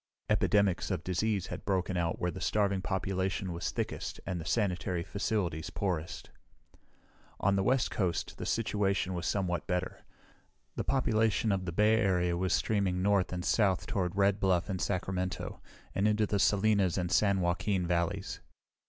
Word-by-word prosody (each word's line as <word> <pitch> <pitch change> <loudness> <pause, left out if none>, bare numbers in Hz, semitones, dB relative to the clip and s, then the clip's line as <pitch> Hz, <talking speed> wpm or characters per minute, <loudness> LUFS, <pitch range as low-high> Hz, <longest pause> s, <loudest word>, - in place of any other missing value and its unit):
Epidemics 100 -4 +2
of 90 -4 -2
disease 100 +1 0
had - - -7
broken 95 -1 0
out 85 -1 0
where 90 - 0
the 95 - -8
starving 100 0 +1
population 95 -1 -2
was 85 - -2
thickest - - -4
and 90 -3 -3
the - - -8
sanitary 90 -5 0
facilities 95 -5 -2
poorest. 85 -4 -3 1.1
On 100 0 +2
the 95 - +2
west 125 +5 +2
coast 90 -7 -2
the - - -4
situation 100 -4 0
was 90 -1 -3
somewhat 90 -4 -1
better. 90 0 -2 0.7
The - - -2
population 110 -4 +1
of 95 -2 -1
the 85 - -3
Bay 105 +5 +4
Area 90 -5 +2
was 90 +1 -1
streaming 95 -2 +1
north 100 -2 +2
and 90 -1 -4
south 100 -5 +2
toward 90 -3 -2
Red 100 0 +3
Bluff 95 0 +1
and 95 - -3
Sacramento, 95 -1 -2 0.3
and 100 +2 +2
into 105 0 +2
the 100 -1 0
Salinas 100 -3 +3
and 90 -2 -1
San 100 -2 +3
Joaquin 90 +1 0
valleys. 85 -1 -1
95 Hz, 160 wpm, -31 LUFS, 90-100 Hz, 1.1 s, Bay